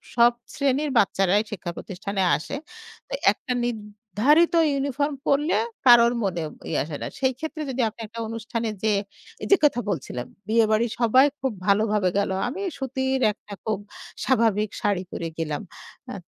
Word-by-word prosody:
সব 240 0 +6 0.2
শ্রেণীর 280 +2 +1
বাচ্চারাই 195 0 +3
শিক্ষা 175 -4 -4
প্রতিষ্ঠানে 200 0 -4 0.2
আসে। 225 - -6 0.5
তো - - -9 0.2
একটা 255 - -7
নির্ধারিত 225 - +1 0.2
ইউনিফর্ম 280 +1 -1
পড়লে 295 +3 +2 0.3
কারো 240 -1 +9 0.2
মনে 175 -4 -1 0.3
ইয়ে 155 - 0
আসে 150 -1 -6
না। - - -3
সেই 260 -1 +2
ক্ষেত্রে 315 0 -5
যদি 260 -1 -1
আপনি 225 - -13
একটা 230 +2 -9
অনুষ্ঠানে 230 0 -3
যেয়ে, 210 -2 +3 0.4
এই - - -3
যে - - +10
কথা 280 -4 +4
বলছিলাম, 130 -8 -4 0.2
বিয়েবাড়ির 220 0 +2
সবাই 255 +4 +5
খুব 265 -2 -1 0.2
ভালোভাবে 205 -2 +3
গেল। 200 - +1 0.2
আমি 340 +11 -5 0.2
সুতির 265 0 -1
একটা 210 - -13
খুব 215 -2 -1 0.5
স্বাভাবিক 220 -5 +2
শাড়ি 200 -3 +1
পরে 165 - -4
গেলাম। 155 -2 -2 0.5
অ্যা - - -6
225 Hz, 150 wpm, -24 LUFS, 200-265 Hz, 0.5 s, যে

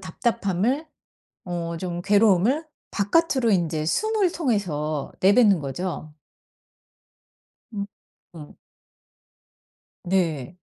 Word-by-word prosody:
답답함을 220 - -1 0.6
어 170 -1 -4
좀 175 -1 -4
괴로움을 210 - +3 0.3
바깥으로 245 +2 +2
인제 160 -4 0
숨을 430 - +1
통해서 155 - -1
내뱉는 200 -1 +5
거죠. 155 +2 -5 1.6
음 200 -2 -3 0.5
음. 150 -3 -11 1.5
네. 175 -4 -1
190 Hz, 165 characters per minute, -24 LUFS, 165-230 Hz, 1.6 s, 내뱉는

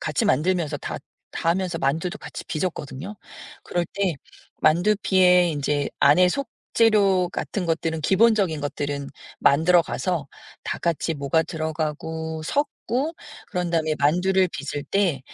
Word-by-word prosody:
같이 155 -3 -1
만들면서 160 0 +1
다 - - -5 0.3
다 165 - 0
하면서 180 -1 -1
만두도 165 +6 -1
같이 - - -8
빚었거든요. 165 +2 -4 0.5
그럴 175 -1 -1
때 195 -5 0 0.5
만두피에 180 0 +4
인제 145 -1 -1
안에 180 +6 +6
속 280 +7 -3 0.2
재료 200 -5 +4
같은 185 +1 -4
것들은 160 -1 -1
기본적인 190 -3 +3
것들은 145 -1 -3 0.3
만들어 165 +5 +4
가서 175 -3 -2 0.4
다 - - -3
같이 170 -1 -1
뭐가 145 +2 +1
들어가고 160 0 -4
섞고 285 - -1 0.4
그런 180 -1 -1
다음에 160 -2 +1
만두를 180 +6 +3
빚을 145 -1 -5
때 185 -9 +1
170 Hz, 290 characters per minute, -24 LUFS, 155-185 Hz, 0.5 s, 안에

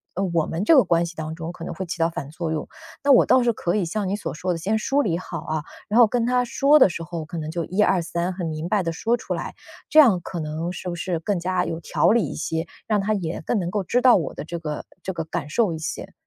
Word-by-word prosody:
呃， 190 - -1
我 165 -2 +2
们 165 +4 -2
这 315 - +6
个 265 - +7
关 170 0 +2
系 170 0 -8
当 160 0 -5
中 165 0 -5
可 175 -1 -10
能 - - -5
会 190 - -4
起 175 - -5
到 165 0 +3
反 155 -4 -6
作 160 +1 -4
用。 155 -1 -3 0.4
那 285 - +4
我 265 - +7
倒 255 - +4
是 235 -1 +2
可 175 -3 -1
以 205 -4 +1
像 195 +4 -2
你 200 - 0
所 205 - -5
说 180 +4 -2
的， 170 - -1
先 195 +7 0
梳 275 +5 +1
理 170 -6 0
好 185 - -6
啊， 155 -1 -3 0.2
然 220 +4 +2
后 235 - +8
跟 235 +1 0
他 250 0 +2
说 275 +5 +4
的 230 - +7
时 170 -1 -5
候 170 -1 -5
可 170 - -7
能 155 -1 -4
就 170 0 -2
1、2、3 180 -2 +1
很 175 -2 -4
明 155 +1 -4
白 205 +2 +2
的 170 -2 -2
说 225 +8 0
出 - - -4
来， - - -5 0.4
这 310 - +6
样 230 -12 +7
可 175 - -5
能 155 +2 -3
是 180 0 -6
不 175 - -3
是 175 0 -2
更 190 +3 -1
加 180 +1 0
有 165 - -3
条 170 - +1
理 225 -4 +3
一 - - -6
些？ 160 +1 -2 0.2
让 215 -2 +2
他 205 +2 0
也 175 -5 -3
更 225 - +1
能 175 -2 -2
够 200 +2 -1
知 245 +7 +1
道 250 -1 +7
我 160 -8 -1
的 - - -6
这 170 +3 -5
个 150 -2 -5 0.2
这 190 - -3
个 165 - -3
感 155 -2 -4
受 210 +3 +2
一 - - -4
些？ 160 - -5
175 Hz, 305 characters per minute, -23 LUFS, 165-210 Hz, 0.4 s, 后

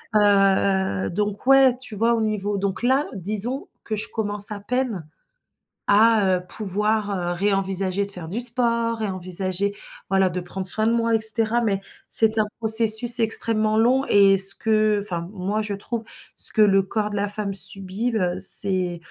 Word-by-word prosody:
heu 195 - +1
heu, - - -4
donc 205 +3 -4
ouais, 270 -2 +5
tu 250 -4 -10
vois? 230 +3 +1
Au 225 - -2
niveau 210 -2 -2
donc 195 0 -3
là, 265 +4 +1
disons 215 - -4
que 220 - -4
je 215 - -4
commence 205 -2 +1
à 205 - -6
peine 225 - -4 0.8
à, 210 -2 +3
heu, 180 - -9
pouvoir, 210 +2 -3 0.2
heu, - - -2
ré-envisager 195 0 -2
de 200 - -6
faire 180 -4 -8
du 205 +9 -4
sport, 235 -1 +1
ré-envisager, 185 0 -4 0.3
voilà, 190 -1 +1
de 180 +1 -5
prendre 185 +1 -5
soin 215 +4 0
de 230 - +1
moi, 230 -1 0
et - - +1
cetera, 220 +2 +2
mais 200 -3 -1 0.3
c'est 220 0 +5
un 215 - +2
processus 225 +1 +6
extrêmement 220 -1 0
long 250 +5 +2
et 195 -4 +4
ce 195 +1 +4
que 215 -1 0
enfin, 170 -4 -5
moi, 205 +3 -3
je 210 -1 -4
trouve, 225 +3 -6 0.3
ce - - -3
que 220 - +2
le 195 -2 +4
corps 210 +2 -3
de 205 - -6
la 200 0 -2
femme 205 -1 -4
subit, 195 +5 +1
heu, 180 -4 -1
c'est 185 -2 +1
210 Hz, 180 wpm, -22 LUFS, 195-225 Hz, 0.8 s, processus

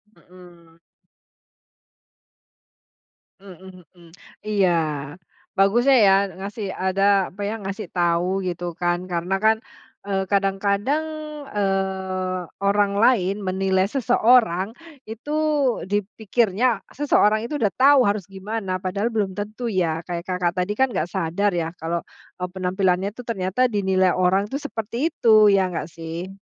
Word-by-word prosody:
Hmm. 175 -2 -18 2.6
Hmm 185 -2 -13
hmm. 170 -2 -18 0.4
Iya. 200 -3 +2 0.9
Bagusnya 240 +8 +4
ya, 195 - +6 0.2
ngasih 200 +1 -5
ada 190 +1 -1 0.3
apa 200 - -9
ya, 215 - -3
ngasih 200 0 -5
tahu 175 -1 +1 0.2
gitu 175 -1 -4 0.2
kan, 175 0 +2
karena 175 +2 -2
kan, 220 0 +5 0.5
eee, 195 -1 -1
kadang-kadang, 200 +8 +1 0.5
eee, 190 -2 -2 0.2
orang 200 0 +2
lain 200 -6 +3
menilai 190 0 +1
seseorang 230 -6 +3 0.4
itu 230 +7 -6 0.6
dipikirnya, 210 +2 0 0.3
seseorang 220 -6 +2
itu 295 - -2
udah 205 -3 +1
tahu 270 0 +5
harus 200 -3 -2
gimana, 195 0 -4
padahal 200 +4 -1
belum 200 -3 -1
tentu 215 +4 -5
ya. 170 -5 0
Kayak 170 -1 -5
Kakak 180 -1 0
tadi 200 +3 -2
kan 265 - +4
nggak 175 -3 -1
sadar 190 +3 0
ya, 165 +1 -4
kalau, 170 +1 -3 0.3
eee, 180 0 -4
penampilannya 185 0 0
itu 250 - -9
ternyata 205 +2 0
dinilai 190 -2 +2
orang 185 +2 +2
itu 275 - -2
seperti 230 +7 -3
itu, 215 -7 +5
ya 190 -2 +2
nggak 165 - -4
sih? 165 +3 -7
195 Hz, 125 wpm, -22 LUFS, 180-215 Hz, 2.6 s, ya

